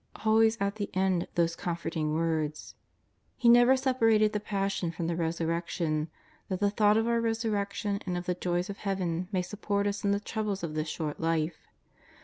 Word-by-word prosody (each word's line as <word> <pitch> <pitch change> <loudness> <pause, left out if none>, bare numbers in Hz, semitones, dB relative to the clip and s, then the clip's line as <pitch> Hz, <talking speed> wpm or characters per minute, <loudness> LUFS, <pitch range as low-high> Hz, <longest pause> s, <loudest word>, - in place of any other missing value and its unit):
Always 220 +1 +4
at 200 +1 -1
the 205 - -3
end 185 -2 +1
those 170 -1 +2
comforting 165 -3 -2
words. 160 -2 -1 0.6
He 245 - +1
never 240 +2 +7
separated 225 -5 +3
the 210 - 0
Pas 200 -1 -1
sion 180 -3 -2
from 165 0 -4
the 170 0 -1
Pesurrection, 165 -1 -1 0.4
that 185 -2 -2
the 205 -1 +2
thought 210 0 +4
of 225 +1 +1
our 235 0 +2
resurrection 210 -3 -1
and 180 -1 -1
of 175 - -5
the 180 - 0
joys 175 0 -1
of 200 - -6
Heaven 185 -3 -2
may 185 -3 0
support 200 +1 -2
us 205 0 -2
in 200 - +2
the 200 0 +2
troubles 210 -2 -3
of 160 -2 -3
this 155 0 -2
short 155 -1 -4
life. 165 0 -1
190 Hz, 185 wpm, -29 LUFS, 165-210 Hz, 0.6 s, never